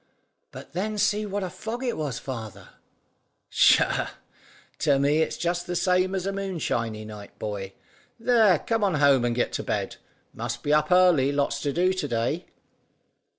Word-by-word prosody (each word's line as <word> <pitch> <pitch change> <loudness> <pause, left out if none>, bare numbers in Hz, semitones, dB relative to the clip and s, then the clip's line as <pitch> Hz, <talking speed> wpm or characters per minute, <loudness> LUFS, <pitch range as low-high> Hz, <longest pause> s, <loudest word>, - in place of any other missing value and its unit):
"But - - -11
then 210 +4 -2
see 210 +1 +1
what 200 0 -3
a 185 - -3
fog 235 +3 -5
it 245 -2 -1
was, 145 -6 -3
father?" 115 -6 -7 0.8
"Tchah! - - +4 0.7
To 140 - +3
me 145 +3 +2
it's 160 - 0
just 175 0 -2
the 175 - -3
same 185 +1 +2
as 185 -1 -2
a 195 - -1
moonshiny 130 - -3
night, 105 -1 -11
boy. 100 -2 -5 0.5
There, 225 -6 +4
come 225 +6 -1
on 190 -5 +2
home 140 -3 +4
and 120 -1 0
get 125 - -1
to - - -2
bed. - - -3 0.4
Must 120 +1 -5
be 145 - +1
up 150 +1 +2
early; 180 -7 +5
lots 140 0 -1
to 145 - -1
do 180 +4 +2
to 185 - -3
day." 120 +9 -2
160 Hz, 170 wpm, -25 LUFS, 125-190 Hz, 0.8 s, early